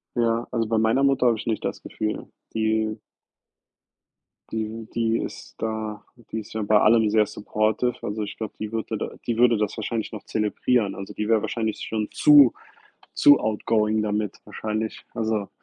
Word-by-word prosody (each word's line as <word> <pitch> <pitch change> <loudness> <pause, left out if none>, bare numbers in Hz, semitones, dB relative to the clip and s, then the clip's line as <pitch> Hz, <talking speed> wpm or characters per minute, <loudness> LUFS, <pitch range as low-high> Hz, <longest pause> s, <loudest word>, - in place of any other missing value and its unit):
Ja, 115 0 +1
also, 115 -2 0
bei 110 0 +1
meiner 110 +5 +3
Mutter 135 -2 +3
habe 115 - +3
ich - - -7
nicht 110 -3 -1
das - - -3
Gefühl. 105 0 -4 0.2
Die 110 0 0 1.5
die 110 0 -4
die 115 -1 +1
ist - - -7
da 110 -1 -3 0.3
die 110 - -2
ist 105 - -10
ja 110 - -2
bei 105 0 +4
allem 110 -1 +5
sehr 110 0 +4
supportive. 110 +3 -1
Also, 105 +1 -3
ich 100 - -7
glaube, 110 -2 -5
die 110 0 -4
würde 110 0 -3
da - - -3 0.2
die 115 -2 -1
würde 120 -1 +5
das 105 -1 -1
wahrscheinlich 110 0 -3
noch 110 - -7
zelebrieren. 105 0 0
Also, 95 - -7
die 105 - -3
wäre 110 -1 +3
wahrscheinlich 110 -1 -2
schon 110 -1 -2
zu 145 -5 +7 0.6
zu 145 0 +6
outgoing 110 0 +1
damit, 105 -1 -2
wahrscheinlich. 110 0 -4
Also 110 -3 -1
110 Hz, 175 wpm, -24 LUFS, 105-115 Hz, 1.5 s, zu